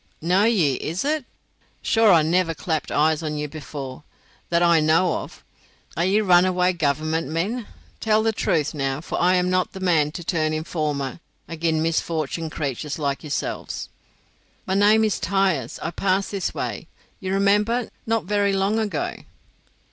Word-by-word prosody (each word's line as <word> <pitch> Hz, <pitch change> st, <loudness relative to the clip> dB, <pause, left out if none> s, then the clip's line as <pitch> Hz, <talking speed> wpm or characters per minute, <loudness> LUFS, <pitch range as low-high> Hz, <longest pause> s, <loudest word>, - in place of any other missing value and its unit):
"Know 180 Hz, +5 st, +2 dB
ye, 170 Hz, -, +2 dB
is 170 Hz, -, -3 dB
it? 300 Hz, -2 st, 0 dB, 0.6 s
Sure 225 Hz, -2 st, +4 dB
I 165 Hz, -3 st, +6 dB
never 165 Hz, +1 st, +1 dB
clapped 160 Hz, -1 st, -2 dB
eyes 155 Hz, +1 st, +2 dB
on 155 Hz, -1 st, -3 dB
ye 150 Hz, -, -2 dB
before, 140 Hz, -3 st, -7 dB, 0.5 s
that 170 Hz, 0 st, +2 dB
I 170 Hz, -1 st, +5 dB
know 160 Hz, +3 st, +3 dB
of. -, -, -9 dB, 0.5 s
Are 170 Hz, -, 0 dB
ye 200 Hz, +3 st, +3 dB
runaway 180 Hz, -1 st, +4 dB
Government 155 Hz, 0 st, 0 dB
men? 200 Hz, -, -2 dB, 0.3 s
Tell 220 Hz, 0 st, +2 dB
the 225 Hz, -, +2 dB
truth, 155 Hz, -8 st, 0 dB
now, 135 Hz, -2 st, -2 dB
for 155 Hz, -, -4 dB
I 180 Hz, +1 st, +4 dB
am 180 Hz, 0 st, +1 dB
not 185 Hz, 0 st, 0 dB
the 190 Hz, -, -7 dB
man 165 Hz, -5 st, +2 dB
to 175 Hz, -, -6 dB
turn 155 Hz, -3 st, 0 dB
informer 155 Hz, -3 st, -2 dB, 0.3 s
agin 160 Hz, -1 st, -1 dB
misfortunate 165 Hz, -1 st, -1 dB
craythurs 145 Hz, 0 st, -3 dB
like 140 Hz, -3 st, -2 dB
yourselves." 150 Hz, -2 st, -4 dB, 0.8 s
"My 190 Hz, -, -1 dB
name 210 Hz, +3 st, +5 dB
is 215 Hz, -2 st, +1 dB
Tyers. 185 Hz, -, 0 dB
I 165 Hz, -, -2 dB
passed 195 Hz, +1 st, 0 dB
this 195 Hz, -3 st, -2 dB
way, -, -, -4 dB, 0.3 s
you 190 Hz, -, -5 dB
may 190 Hz, -, 0 dB
remember, 210 Hz, +4 st, +2 dB, 0.2 s
not 225 Hz, -3 st, 0 dB
very 200 Hz, 0 st, +1 dB
long 195 Hz, +3 st, +1 dB
ago." 205 Hz, -9 st, -2 dB
170 Hz, 165 wpm, -23 LUFS, 155-195 Hz, 0.8 s, I